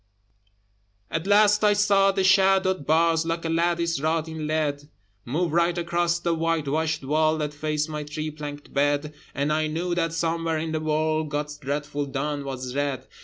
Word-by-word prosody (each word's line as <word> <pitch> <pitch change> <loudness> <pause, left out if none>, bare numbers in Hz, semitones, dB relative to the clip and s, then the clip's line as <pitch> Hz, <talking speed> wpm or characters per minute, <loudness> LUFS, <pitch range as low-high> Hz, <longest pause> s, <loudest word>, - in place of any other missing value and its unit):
At 165 +3 -2
last 210 +1 +5
I 210 -1 +5
saw 200 -1 +4
the 190 0 0
shadowed 190 -3 +3
bars 165 +1 +3
Like 165 0 -3
a - - -1
lattice 170 -1 +1
wrought 160 +1 0
in 160 -1 -5
lead, 145 -2 -1 0.4
Move 155 +6 -1
right 170 +1 +2
across 170 0 0
the 170 -1 -1
whitewashed 160 -1 -1
wall 155 +2 +2
That 150 -1 -3
faced 150 0 -2
my 150 -1 -4
three 155 +1 -5
plank 145 -1 -8
bed, 145 +1 +1 0.2
And 145 +2 0
I 155 0 +1
knew 170 +3 -2
that 165 -2 0
somewhere 165 -1 -1
in 160 +1 -3
the 155 - -1
world 155 0 0
God's 150 0 -3
dreadful 145 +1 -3
dawn 145 +1 -3
was 130 -2 -5
red. 140 -2 -2
155 Hz, 170 wpm, -25 LUFS, 150-170 Hz, 0.4 s, last